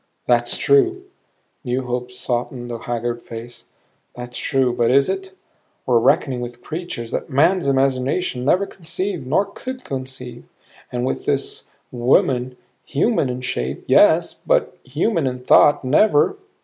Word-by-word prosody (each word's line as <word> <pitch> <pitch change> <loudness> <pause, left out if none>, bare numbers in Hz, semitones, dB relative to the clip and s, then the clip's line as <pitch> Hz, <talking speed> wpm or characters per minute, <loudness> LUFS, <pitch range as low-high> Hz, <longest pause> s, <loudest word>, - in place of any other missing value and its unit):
"That's - - +2
true" 380 -3 +3 0.6
new 130 0 -1
hope 125 0 -3
softened 120 0 -3
the 115 - -5
haggard 120 0 -3
face 115 +1 -9 0.5
"that's 125 0 -8
true 130 -3 +1
but 120 -1 +2
is 135 +2 +4
it? 190 0 -4 0.5
We're 120 -2 +4
reckoning 135 -1 +2
with 120 0 -8
creatures 155 -8 -5
that - - -3
man's 165 +5 +2
imagination 135 +1 0
never 185 +9 +3
conceived 180 -4 -4
nor 195 +9 +2
could 255 +6 -8
conceive. 130 -2 -6 0.5
And 125 0 -2
with - - -3
this - - -1 0.2
woman 125 +1 +1 0.3
human 150 - +1
in 125 0 -4
shape, 65 - -3
yes, - - +4
but - - 0
human 155 - 0
in 125 -1 -4
thought 145 +2 +5
never. 155 - +3
130 Hz, 135 wpm, -21 LUFS, 125-170 Hz, 0.6 s, thought